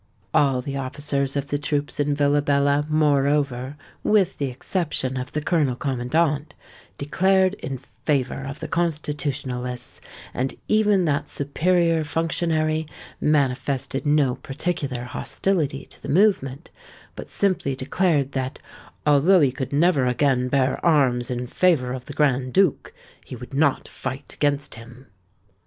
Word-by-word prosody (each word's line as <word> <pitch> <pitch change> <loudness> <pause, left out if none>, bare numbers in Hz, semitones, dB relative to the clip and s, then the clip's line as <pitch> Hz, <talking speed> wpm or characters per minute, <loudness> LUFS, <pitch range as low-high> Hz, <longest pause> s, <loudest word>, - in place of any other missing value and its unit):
All 135 -3 +3
the 140 0 -4
officers 140 0 -2
of 140 -1 -1
the 145 - -1
troops 145 0 -2
in 145 0 +1
Villabella, 145 0 +2
moreover—with 145 - +1
the 140 - 0
exception 135 -1 -2
of 130 +1 -4
the 150 - -3
colonel 150 -8 +1
commandant,—declared 150 +7 0
in 135 0 -4
favour 135 0 -2
of 140 +1 -6
the - - -4
Constitutionalists; 140 -6 -3 0.3
and 130 +1 -2
even 210 -4 +3
that 145 -1 0
superior 165 +3 +1
functionary 160 0 0 0.3
manifested 135 -2 0
no 145 -4 +3
particular 140 -2 -3
hostility 145 +3 -2
to - - -15
the - - -7
movement, 155 -5 +1 0.4
but - - -8
simply 185 -9 0
declared 140 +1 0
that 130 0 -3 0.5
"although 150 +6 +5
he 140 -3 +4
could 130 0 -5
never 145 -3 +3
again 125 0 +2
bear 130 0 +1
arms 130 -7 +3
in 125 0 -3
favour 130 -3 +2
of 130 -1 -6
the 145 - -8
Grand 135 -4 +1
Duke, 190 -6 +2 0.3
he - - -8
would 125 +3 -10
not 140 0 +1
fight 130 +2 -6
against 145 0 -1
him." 120 +3 -12
145 Hz, 130 wpm, -23 LUFS, 130-155 Hz, 0.5 s, although